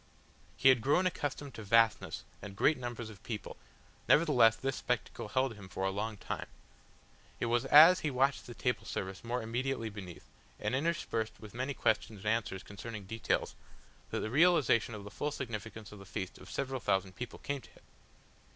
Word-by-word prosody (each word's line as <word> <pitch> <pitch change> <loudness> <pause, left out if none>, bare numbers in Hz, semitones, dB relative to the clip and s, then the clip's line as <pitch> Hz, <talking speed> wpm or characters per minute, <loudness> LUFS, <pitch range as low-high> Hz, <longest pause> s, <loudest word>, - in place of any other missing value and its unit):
He 135 - +6
had 130 -3 +5
grown 145 +10 +3
accustomed 145 -6 -2
to 110 - -8
vastness 115 +2 +3 0.2
and 100 -1 -8
great 150 +9 +4
numbers 120 -2 -5
of 100 - -14
people, 110 -3 -6 0.5
nevertheless 135 -8 +6
this 135 +2 -2
spectacle 125 -3 -2
held 130 +3 +1
him 100 -3 -12
for 95 - -4
a 95 - +1
long 105 +2 -3
time. - - -5 0.9
It - - 0
was 120 0 +1
as 165 +5 +9
he 155 - -1
watched 135 +1 +1
the 120 - -8
table 125 -2 -1
service 95 -2 -4
more 120 0 -2
immediately 115 0 -2
beneath, 95 -4 -9 0.3
and - - -2
interspersed 130 -6 -1
with 105 -2 -11
many 130 +3 -3
questions 110 -1 0
and - - -12
answers 105 -4 -3
concerning 105 0 -8
details, 115 +3 -1 0.6
that - - -2
the 110 - -3
realisation 145 -8 +4
of 105 - -8
the 100 - -9
full 150 - -2
significance 115 -5 -6
of 105 - -11
the 100 - -11
feast 95 -1 -5
of - - -12
several 135 -1 -2
thousand 95 -4 0
people 120 +3 -6
came 140 -1 -4
to - - -16
him. - - -21
115 Hz, 185 wpm, -33 LUFS, 105-135 Hz, 0.9 s, as